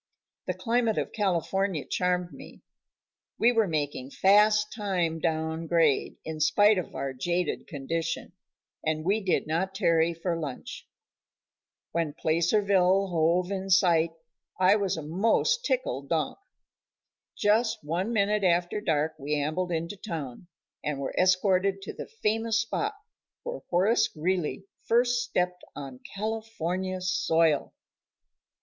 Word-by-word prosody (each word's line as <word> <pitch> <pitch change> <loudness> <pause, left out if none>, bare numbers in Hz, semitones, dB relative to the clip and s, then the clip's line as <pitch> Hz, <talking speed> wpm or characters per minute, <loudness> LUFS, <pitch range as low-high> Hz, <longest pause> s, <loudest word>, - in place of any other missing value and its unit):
The - - -1
climate 230 -2 +1
of - - -1
California 195 -3 0
charmed 180 -1 -1
me. - - -13 0.7
We 235 - +4
were 225 -3 +2
making 145 -5 -2
fast 210 +5 +4
time 180 -7 -1
down 160 0 -2
grade, 160 -4 +2
in 160 -1 -5
spite 205 +6 +4
of 180 - -7
our 135 -1 -3
jaded 175 +5 -2
condition, 165 +3 -3 0.5
and 155 0 -1
we 205 +4 +2
did 185 - +1
not 185 +5 -1
tarry 170 -3 +2
for 170 +1 -2
lunch. 145 -5 -7 1.0
When 165 -3 -1
Placerville 190 +3 +2
hove 175 +2 +1
in 195 0 -3
sight 175 -3 +4 0.5
I 185 +2 +5
was 200 -4 0
a 160 - -5
most 225 - +1
tickled - - -1
donk. - - -1 1.0
Just 220 0 +2
one 175 +8 -2
minute 210 -1 +1
after 175 +2 +1
dark 155 -4 0
we 150 +2 -1
ambled 155 +5 -1
into 170 +4 -3
town, 165 - -6 0.4
and 150 -2 -2
were 140 - -3
escorted 185 +1 +2
to - - -6
the - - -8
famous 225 +1 +1
spot 415 - -2 0.5
where - - -5
Horace 195 +7 +3
Greeley 180 +3 -2 0.2
first 245 +1 +2
stepped 180 -6 -1
on 135 -3 -8 0.2
California 190 -4 -3
soil. 165 -4 +1
180 Hz, 130 wpm, -27 LUFS, 160-205 Hz, 1.0 s, I